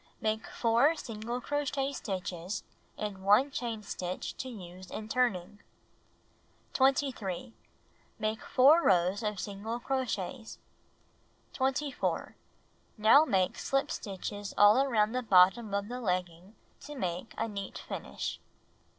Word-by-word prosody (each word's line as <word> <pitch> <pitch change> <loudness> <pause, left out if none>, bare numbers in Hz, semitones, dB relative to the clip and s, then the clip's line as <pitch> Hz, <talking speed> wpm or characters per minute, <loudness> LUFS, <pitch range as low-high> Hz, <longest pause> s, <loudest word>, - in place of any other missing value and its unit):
Make 220 0 -1
4 240 +7 +3
single 235 -2 -5
crochet 280 0 -1
stitches 185 -4 -4 0.3
and 200 -3 -5
1 210 +8 +5
chain 230 -4 -4
stitch 180 -2 -5
to 260 - -5
use 185 -5 -10
in 215 - -6
turning. 205 -5 0 1.1
23. 255 -6 +1 0.6
Make 220 +1 -2
4 290 +6 +5
rows 185 - +3
of 210 -3 -2
single 205 +5 -4
crochets. 240 -3 -3 1.0
24. 270 +1 -1 0.6
Now 225 +8 +7
make 190 -9 +1
slip 275 0 0
stitches 205 0 -5
all 205 +4 +7
around 220 -6 +2
the 255 +1 -1
bottom 195 +1 +5
of 200 0 -1
the 250 +2 -5
legging 180 0 -3 0.2
to 295 - -9
make 180 -4 -4
a - - -1
neat 200 -3 -6
finish. - - -5
215 Hz, 115 wpm, -31 LUFS, 195-255 Hz, 1.1 s, Now